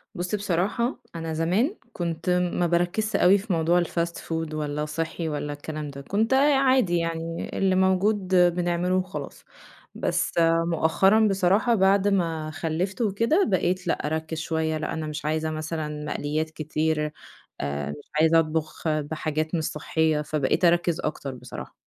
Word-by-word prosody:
بُصّي، 180 +4 -2
بصراحة 205 +6 -1 0.2
أنا 165 -1 -4
زمان 185 - +1 0.2
كنت 170 0 -3 0.2
ما 175 - +1
باركّزش 175 +6 0
اوي 190 +3 +6
في 200 0 -3
موضوع 170 +2 +3
الFast 170 0 -2
food 160 -1 -4
والّا 150 0 -2
صحي 160 +2 -3
والّا 145 -1 -3
الكلام 150 0 -6
ده، 140 0 -8
كنت 215 - 0
آآ 280 +2 +5
عادي 260 -9 +3
يعني، 165 0 -3
اللي 190 -1 +2
موجود 190 +1 +2
بنعمله 175 0 +2
وخلاص، 185 +1 -4 0.5
بس - - 0 0.4
مؤخرًا 190 +6 +3
بصراحة 195 +4 +3
بعد 195 0 +3
ما 165 -6 0
خلّفت 170 +7 -2
وكده 230 - +2
بقيت 185 -2 0
لأ - - 0
أرَكّز 160 +1 -3
شوية، 160 0 -1
لأ 155 - -3
أنا 160 -1 -3
مش 150 0 -5
عايزة 155 +1 0
مثلًا 155 -1 -4
مقليات 150 +1 -2
كتير 155 0 -1 0.5
آآ 70 0 -3
مش 75 - -11
عايزه 160 +1 +5
أطبخ 155 0 -2
بحاجات 155 +1 -1
مش 160 - -1
صحية، 155 0 0
فبقيت 150 +3 0
أرَكّز 170 -1 +3
أكتر 140 -3 -4
بصراحة. 125 - -9
165 Hz, 150 wpm, -25 LUFS, 155-185 Hz, 0.5 s, اوي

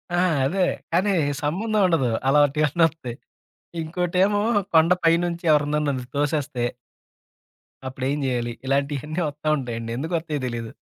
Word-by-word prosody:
ఆ! - - 0 0.3
అదే. 180 +8 -1 0.3
కానీ, 190 +4 +2 0.3
సంబంధం 210 +8 0
ఉండదు. 150 -8 +2 0.2
అలంటియాన్ని 150 +3 +3
వస్తాయి. 140 -7 -8 0.7
ఇంకోటేమో 180 +5 +1 0.3
కొండ 160 +2 +6
పైనుంచి 170 +1 +2
ఎవరన్నా 150 0 +2
నన్ను 130 -3 -2
తోసేస్తే... 145 -4 -1 1.2
అప్పుడు 130 0 -5
ఏం 145 - -1
జేయాలి? 120 -2 -1
ఇలాంటియన్నీ 140 +4 -1
ఒత్తా 150 +1 -4
ఉంటాయండి. 115 -3 -5
ఎందుకొత్తాయో 160 0 -2
తెలిదు. 115 -1 -5
150 Hz, 115 wpm, -23 LUFS, 135-170 Hz, 1.2 s, కొండ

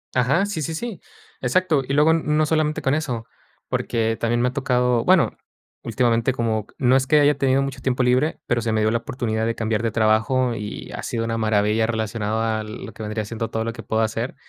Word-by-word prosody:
Ajá, 140 +10 +3
sí, 205 -6 -3
sí, 160 +2 -3
sí. 205 +1 -5 0.4
Exacto. 150 +2 +2
Y 135 - -2
luego, 150 +2 +5
n 165 0 +1
no 155 +1 +2
solamente 155 -1 0
con 135 - +1
eso, 125 -7 -3 0.4
porque 115 -1 -1
también 120 +1 +1
me 125 - +3
ha - - -9
tocado, 125 -3 +1
bueno, 185 -1 +3 0.5
últimamente 120 0 +1
como 110 -3 -1
no 130 0 +3
es 130 0 +2
que 150 - +5
haya 145 0 +4
tenido 135 0 +2
mucho 135 -2 -4
tiempo 130 -1 0
libre, 130 +5 +2
pero 120 -1 +1
se 115 0 -1
me 110 0 +1
dio 110 - +3
la 115 - +1
oportunidad 110 -2 -2
de 115 - -1
cambiar 110 -1 -1
de 115 - 0
trabajo 110 +3 +2
y 105 -1 -6
ha - - -6
sido 115 -1 -2
una 115 0 -2
maravilla 110 0 +2
relacionado 110 -1 -2
a 110 -1 -1
lo 110 +2 -8
que - - -8
vendría 105 0 -3
siendo 115 +1 -4
todo 110 - -2
lo 115 - -3
que 115 - -9
puedo 110 +3 0
hacer. 115 +3 -2
120 Hz, 225 wpm, -22 LUFS, 110-135 Hz, 0.5 s, luego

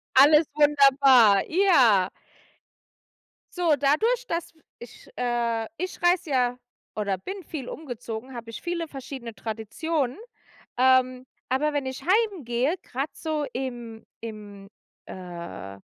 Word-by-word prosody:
Alles 300 +3 +7
wunderbar, 275 -8 +5
ja. 260 - +4 1.5
So, 335 -4 +3
dadurch, 445 - +2
dass 335 -3 -3 0.3
ich 240 - -13
äh, 235 -2 -1
ich 365 +1 -5
reise 350 -2 +2
ja 250 -2 +1 0.4
oder 200 -3 -1
bin 380 - -7
viel 280 -6 -6
umgezogen, 245 -3 -7
habe 230 -1 -8
ich 230 - -8
viele 340 -1 -3
verschiedene 265 -4 -8
Traditionen. 240 +6 -3 0.6
Ähm, 255 0 +3 0.3
aber 295 +4 +1
wenn 285 -2 -2
ich 260 -1 -5
heimgehe, 340 - +1
grad 270 +4 -5
so 310 -2 -2
im 240 -4 -6 0.2
im, 210 -3 -9 0.4
äh 170 - -8
260 Hz, 115 wpm, -25 LUFS, 230-310 Hz, 1.5 s, Alles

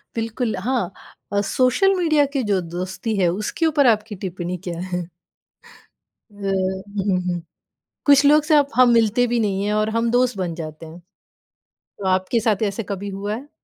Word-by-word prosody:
बिल्कुल। 225 0 -2
हाँ, 230 -4 -1 0.4
अ, 200 - +2
social 265 +11 +3
media 315 -5 +3
के 270 -3 0
जो 190 - +3 0.2
दोस्ती 190 +4 -3
है 185 - +3
उसके 210 - -2
ऊपर 290 -4 +3
आपकी 215 -1 +1
टिप्पणी 180 0 -4
क्या 170 -1 -4
है? 180 -1 -3 1.3
व 205 -1 -7
हुँ, 190 0 -1
हुँ। 180 -1 -2 0.7
कुछ 285 0 +6
लोग 300 +1 +6
से 305 0 +3
अप 285 -1 +3
हम 250 -1 +6
मिलते 230 +1 +3
भी 240 0 0
नहीं 200 -2 0
है 210 - 0
और 215 +1 +1
हम 230 +1 0
दोस्त 245 -1 +2
बन 175 -3 -2
जाते 155 -1 -8
हैं। 160 +2 -11 1.0
तो 200 - -7
आपके 185 +5 +1
साथ 215 -2 0
ऐसा 205 +2 -2
कभी 200 0 -4
हुआ 200 +2 -4
है? 280 +5 -10
210 Hz, 175 wpm, -21 LUFS, 185-245 Hz, 1.3 s, कुछ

